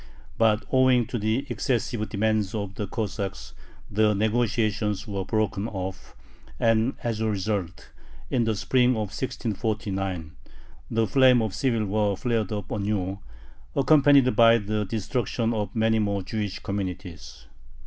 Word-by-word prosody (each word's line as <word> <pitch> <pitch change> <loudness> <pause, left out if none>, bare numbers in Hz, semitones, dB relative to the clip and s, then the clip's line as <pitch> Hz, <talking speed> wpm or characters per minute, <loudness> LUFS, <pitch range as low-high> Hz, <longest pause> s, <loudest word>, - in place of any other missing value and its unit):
But 110 -1 +3
owing 130 -2 +4
to 120 - -4
the 110 +6 0
excessive 120 -6 -1
demands 110 -1 0
of 100 -2 -4
the 100 0 -4
Cossacks 100 -2 -4 0.4
the 105 0 +3
negotiations 110 -1 0
were 100 -2 -3
broken 110 0 -1
off, 95 -3 -6 0.4
and 115 +2 +2
as 115 -2 -2
a 110 0 0
result, 100 -3 -3 0.4
in 120 -3 +2
the 110 -1 0
spring 125 +4 +2
of 105 -3 -3
1649, 100 - -3 0.6
the 115 0 +1
flame 130 +1 +5
of 110 -3 -3
civil 115 0 0
war 100 -1 0
flared 115 -4 -1
up 105 -2 -4
anew, 100 -2 -2 0.6
accompanied 140 -3 +5
by 115 +1 +7
the 105 0 -2
destruction 115 +2 -1
of 105 0 -3
many 110 0 +2
more 100 -2 0
Jewish 105 0 -3
communities. 95 -5 -6
110 Hz, 135 wpm, -25 LUFS, 100-115 Hz, 0.6 s, by